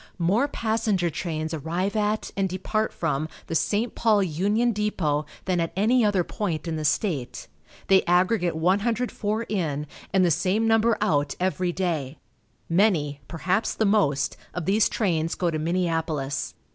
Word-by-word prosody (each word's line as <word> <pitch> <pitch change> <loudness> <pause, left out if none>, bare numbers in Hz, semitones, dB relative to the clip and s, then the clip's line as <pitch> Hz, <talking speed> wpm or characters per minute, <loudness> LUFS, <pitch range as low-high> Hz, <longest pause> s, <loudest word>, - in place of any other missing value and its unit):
More 200 +10 +2
passenger 220 - 0
trains 155 0 -3
arrive 170 +7 -2
at, 215 0 0
and 195 -1 0
depart 215 +4 -1
from, 155 -1 -2 0.2
the - - -5
St. 210 +8 0
Paul 215 -3 +3
Union 205 +8 +1
Depot 165 -9 -1 0.2
than 185 -2 +1
at 165 -1 -1
any 230 +6 +3
other 205 -4 +2
point 170 -4 -3
in 165 - -2
the 155 - -3
state. 145 - -1 0.4
They 190 +1 +5
aggregate 180 0 +2
104 210 +5 0
in, 160 -10 -2 0.3
and 190 -1 +4
the 175 - +3
same 200 +8 +1
number 225 0 +3
out 145 -9 +1
every 185 -1 0
day. 160 -6 -2 0.5
Many 165 -6 +2
perhaps 180 +6 -1
the 220 - +1
most 195 -10 +2 0.2
of 175 -3 -3
these 205 +4 +3
trains 165 -6 0
go 175 -2 0
to 155 - -2
Minneapolis. 160 -4 -1
185 Hz, 150 wpm, -25 LUFS, 160-210 Hz, 0.5 s, They